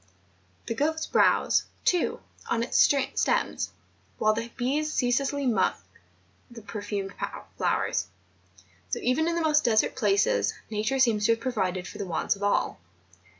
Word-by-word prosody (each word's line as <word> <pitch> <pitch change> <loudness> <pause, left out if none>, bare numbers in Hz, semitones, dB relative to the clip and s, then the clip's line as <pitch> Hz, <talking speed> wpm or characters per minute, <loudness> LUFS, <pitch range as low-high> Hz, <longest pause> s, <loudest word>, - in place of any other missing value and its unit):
The - - -2
goats 315 +6 0
browse, - - +3 0.2
too, 355 -2 +1 0.3
on 230 0 +1
its 235 - -5
stems, 275 -2 +2 0.5
whilst 215 +1 +2
the 230 - -7
bees 290 +5 0
ceaselessly 275 +2 0
suck 190 - +1 0.7
the 235 -2 -11
perfumed 205 -1 -4 0.4
flowers. - - 0 0.8
So, - - -1
even 270 +6 +1
in 340 - 0
the 340 - 0
most 305 -1 +3
desert 220 -3 +2
places. 195 - +2 0.2
Nature 215 +5 0
seems 225 -5 +3
to 230 - +5
have 225 - -4
provided 190 -7 -2
for - - -10
the 200 - -3
wants 170 +4 0
of 200 - -15
all. 205 - 0
230 Hz, 145 wpm, -27 LUFS, 205-275 Hz, 0.8 s, to